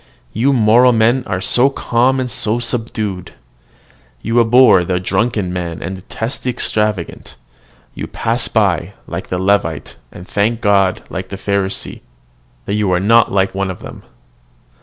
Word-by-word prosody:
You 125 +6 +2
moral 120 0 +4
men 120 +3 +2
are 95 - -2
so 125 +7 +3
calm 130 0 +1
and 130 - -1
so 110 +2 0
subdued! 110 -5 -3 0.9
You 115 +2 +1
abhor 115 -5 +5
the 90 +1 -1
drunken 100 0 -1
man, 85 -2 -4
and 95 - -4
detest 110 +6 -6
the 130 - -2
extravagant; 105 -6 -2 0.6
you - - -6
pass 115 +1 -1
by, 95 -4 0
like - - -6
the 90 - -3
Levite, 95 -5 -1
and 90 - -11
thank 110 +3 0
God, 100 -2 +2
like 95 0 -5
the 95 - -6
Pharisee, 100 0 -3 0.6
that - - -3
you 105 -2 0
are 90 - +2
not 115 +4 +4
like 95 -1 +1
one 95 0 -2
of 95 - -7
them. - - -10
105 Hz, 155 wpm, -16 LUFS, 95-115 Hz, 0.9 s, abhor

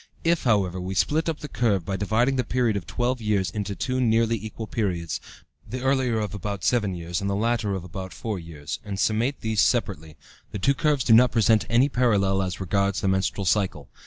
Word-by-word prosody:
If, 165 -2 +1
however, 95 -6 +1
we 95 +1 -4
split 155 - +1
up 160 - -4
the 150 - -5
curve 105 - 0
by 95 - -2
dividing 110 +7 +1
the 130 - +1
period 120 -4 0
of 95 -3 -4
twelve 120 +3 -1
years 100 -5 0
into 100 0 -4
two 130 +4 -1
nearly 115 -1 +2
equal 110 +1 -6
periods, 90 -7 -2 0.5
the 125 +3 -5
earlier 130 -3 +1
of 105 -1 -3
about 100 -2 -4
seven 105 -7 +1
years 85 +2 -4
and 100 - -1
the 100 - 0
latter 110 -1 0
of 95 - -5
about 95 +1 -7
four 110 -4 -4
years, 75 -3 -7
and 100 -2 -5
summate 115 +7 0
these 110 -2 +1
separately, 80 - 0 0.3
the - - -4
two 135 +8 +2
curves 150 -3 +1
do 115 - +4
not 125 +3 +6
present 110 -1 +3
any 120 +4 +4
parallel 100 -8 +2
as 95 -1 -3
regards 100 +1 0
the 100 - 0
menstrual 95 +1 0
cycle. 90 -8 0
105 Hz, 210 wpm, -25 LUFS, 95-120 Hz, 0.5 s, not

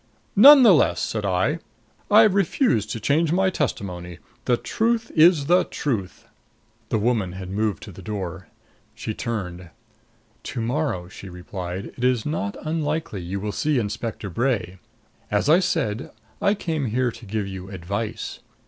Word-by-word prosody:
"None 275 +6 +10
the 215 -5 +8
less," 150 - +3
said 105 -2 -2
I, 100 - +1 0.5
"I 215 +2 +8
refuse 195 - +2
to 115 - -4
change 150 +8 +2
my 190 +2 +2
testimony. 90 - -3 0.3
The 120 -2 +3
truth 225 - -1
is 160 -2 +5
the 175 +4 +4
truth 105 -10 -3 0.3
" 110 +1 -39
The 110 - +1
woman 105 -5 0
had 95 0 -7
moved 105 0 -1
to 105 - -9
the 95 - -12
door. 95 -3 -5 0.5
She 110 - -4
turned. 90 -7 -5 0.7
"To - - -6
morrow," 115 - -1
she 95 +1 -10
replied, 90 +1 -6
"it 125 - -7
is 125 -3 +2
not 100 -10 -2
unlikely 155 - -2
you 90 +3 -4
will 105 +1 -3
see 150 +6 0
Inspector 110 -1 -3
Bray. 110 -5 -1 0.5
As 105 +5 +1
I 165 +4 +7
said, 155 - -1 0.3
I 200 - +3
came 160 -7 -2
here 125 +2 0
to 115 +1 -12
give 105 0 -2
you 95 -1 -7
advice. 100 +4 -4
115 Hz, 155 wpm, -23 LUFS, 95-155 Hz, 0.7 s, None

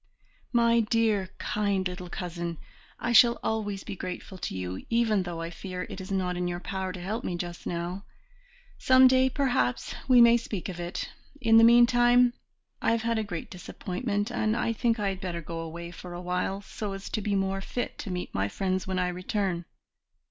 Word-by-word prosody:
"My 235 -1 +4
dear, 215 -3 +1
kind 200 -3 0
little 180 0 -7
cousin, 170 -2 -4 0.4
I 240 - -1
shall 235 +1 +7
always 205 -3 -2
be 205 - -6
grateful 185 +1 -6
to 95 - -4
you, 90 0 -4
even 230 -3 +2
though 175 -2 -5
I 165 +1 -4
fear 180 +1 -5
it 190 - -6
is 190 - -8
not 185 -2 0
in 180 0 -1
your 175 0 -3
power 190 +1 -3
to 180 - -7
help 210 +7 -3
me 180 - -2
just 175 0 -6
now. 175 +3 -3 0.8
Some 260 0 +7
day, 260 0 +4
perhaps, 125 - 0
we 255 -2 +7
may 235 0 +8
speak 210 -5 -5
of 175 -2 -6
it; 175 0 -4 0.3
in 225 -3 +5
the 225 - +8
meantime 240 +1 +6 0.5
I - - +2
have 230 -1 -1
had 230 -1 +1
a - - 0
great 175 -6 -6
disappointment, 205 +4 -3
and 220 -1 0
I 230 - 0
think 230 0 +1
I 205 -1 +1
had 190 -1 -5
better 175 -3 -3
go 165 0 -6
away 170 +1 -6
for 175 0 -9
awhile, 180 +2 -2
so 205 0 -5
as 195 +1 -7
to 215 - -1
be 205 0 0
more 195 0 0
fit 245 +5 -4
to 205 - -5
meet 180 -1 -4
my 95 0 0
friends 185 - -2
when 190 0 -1
I 180 -1 +1
return." 180 -1 -2
195 Hz, 200 wpm, -28 LUFS, 180-230 Hz, 0.8 s, may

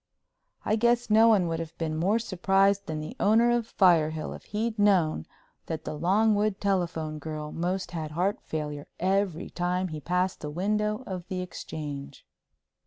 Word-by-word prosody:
I 215 - +2
guess 235 0 +2
no 220 +2 +7
one 205 -6 +4
would 165 0 -2
have 165 -1 -7
been 160 -2 -2
more 190 +7 +2
surprised 195 -1 +2
than 155 -1 -3
the 155 +11 -7
owner 230 +3 +4
of 235 -1 0
Firehill 160 -5 +3
if - - -11
he'd 220 +1 -2
known 180 - +3 0.4
that 160 -1 -4
the - - -3
Longwood 205 +5 +2
telephone 170 -6 -1
girl 150 0 -5
most 180 +2 -2
had 160 -3 -4
heart 185 - -1
failure 150 -2 -5
every 190 -2 0
time 180 +1 -1
he 155 -1 -6
passed 180 +3 0
the 150 - -4
window 210 +7 -1
of 185 -2 -6
the 185 -1 -3
Exchange. 150 -5 -7
180 Hz, 165 wpm, -27 LUFS, 160-205 Hz, 0.4 s, no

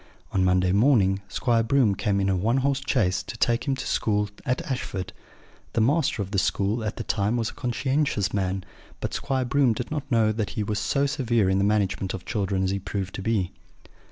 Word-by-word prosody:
On 95 - +1
Monday 90 0 +3
morning 100 -3 +3
Squire 115 +3 +1
Broom 115 -2 +3
came 100 +1 0
in 95 - +1
a 95 - +2
one 110 +8 +1
horse 140 -1 +1
chaise 100 -9 +1
to 115 - -8
take 120 +4 +1
him 135 - +2
to 130 - -5
school 105 -1 0 0.2
at 125 0 0
Ashford. 100 - -4 0.6
The 115 - +2
master 135 -3 +2
of 95 - -10
the 100 - +2
school 100 +4 0
at 105 - -3
that - - -6
time 105 +3 +1
was 115 -2 -1
a - - -17
conscientious 130 -4 0
man 95 -1 -1 0.4
but - - -4
Squire 135 -2 -1
Broom 130 -1 +3
did 120 +5 -5
not 145 -2 -4
know 110 -2 +4
that 110 -1 -2
he 105 - +1
was 105 0 -2
so 140 +5 +1
severe 120 -8 +1
in 95 - +2
the - - +2
management 100 -2 0
of 95 - -9
children 95 -2 -1
as 95 - +1
he 100 - -1
proved 95 0 -4
to - - -5
be. 100 -4 0
110 Hz, 215 wpm, -25 LUFS, 95-125 Hz, 0.6 s, know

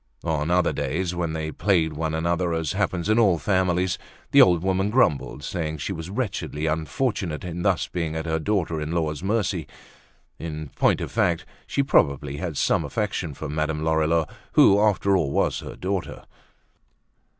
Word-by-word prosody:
On 80 -2 -1
other 90 0 +2
days 85 +6 -2
when 85 -2 -2
they 80 -1 -3
plagued 80 -4 +1
one 80 +1 -2
another 85 +1 0
as 80 -3 -1
happens 95 -3 -1
in 110 +2 +3
all 100 -7 +4
families, 95 0 +1 0.3
the - - +8
old 90 -2 +5
woman 95 +1 +1
grumbled 105 - +1
saying 80 -3 -3
she 80 +6 -3
was 80 0 -6
wretchedly 95 - -3
unfortunate 80 +2 -1
in 90 -1 -5
thus 95 -1 +1
being 80 -3 -3
at 80 0 -3
her 80 -1 0
daughter 85 -3 -1
in 75 +2 -3
law's 80 -3 -1
mercy. 95 -5 -1 0.7
In 75 -2 -5
point - - +2
of - - -4
fact 95 -5 +1 0.2
she 140 - +1
probably 70 - +2
had 80 -3 -4
some - - +2
affection 95 -8 -3
for - - -6
Madame 75 +1 -2
Lorilleux 80 0 +2 0.3
who 100 - +6
after 100 -2 +3
all 80 -7 +1
was - - +1
her - - -8
daughter. 95 0 -3
85 Hz, 170 wpm, -24 LUFS, 80-95 Hz, 0.7 s, the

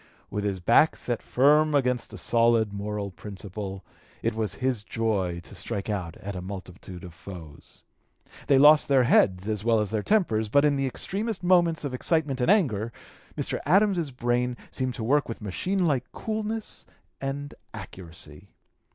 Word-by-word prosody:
With 105 0 -2
his 100 -2 -1
back 120 - +4
set 120 -2 -3
firm 150 +3 +3
against 125 -3 +1
a - - -8
solid 115 -3 +3
moral 100 0 -4
principle, 95 0 -7 0.4
it 115 - +1
was 110 -3 -2
his 125 -2 -1
joy 100 -7 -1
to - - -12
strike 100 +2 -3
out 90 -5 -4
at 100 0 -6
a 90 - -4
multitude 90 -1 -8
of 90 -2 -9
foes. 85 -4 -12 0.6
They 140 - +5
lost 150 +2 +7
their 135 -2 +4
heads 95 -5 +3
as 105 -2 -2
well 115 -1 +3
as 105 -1 -1
their 110 -1 0
tempers, 110 - +1
but 140 +6 +4
in 145 -1 +3
the 135 -1 0
extremest 200 - -2
moments 175 -3 +3
of 140 -3 -3
excitement 140 -1 0
and 125 - +2
anger 125 - +2 0.5
Mr. - - -2
Adams's 185 -1 +3
brain 125 -1 -1
seemed 130 -1 -2
to 115 - -5
work 140 +4 +2
with 115 - -5
machine 180 - -1
like 135 -6 0
coolness 220 0 -4 0.4
and 140 +1 -4 0.2
accuracy. 95 -3 -9
115 Hz, 165 wpm, -26 LUFS, 100-145 Hz, 0.6 s, lost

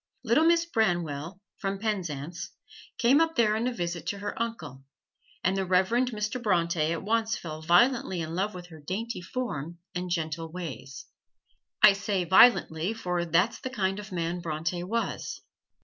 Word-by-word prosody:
Little 255 +7 +3
Miss 335 0 +4
Branwell, 175 - -1 0.2
from 195 -1 -2
Penzance, 175 -5 -3 0.5
came 265 +6 +5
up 325 0 +1
there 215 -3 +3
on 230 +3 0
a - - 0
visit 175 -6 -4
to 200 - -2
her 205 +1 -4
uncle, 165 - -4 0.6
and 185 +2 +2
the 195 - 0
Reverend 190 +7 +2
Mr. 215 +1 -3
Bronte 170 -6 +1
at 170 - -3
once 225 +2 +1
fell 155 -2 -7
violently 190 +3 +3
in 160 0 -4
love 195 +3 -1
with 180 0 -9
her 160 -2 -12
dainty 200 +7 -4
form 175 - -4 0.2
and 180 0 -3
gentle 165 -1 -2
ways. 135 -6 -7 0.8
I 210 - +10
say 195 -1 -1
"violently," 185 -1 +5
for 180 -5 -2
that's 180 +7 +2
the 260 - -5
kind 195 -5 -1
of 210 0 -9
man 170 0 -2
Bronte 170 +1 -3
was. 230 +6 -3
185 Hz, 165 wpm, -28 LUFS, 170-220 Hz, 0.8 s, I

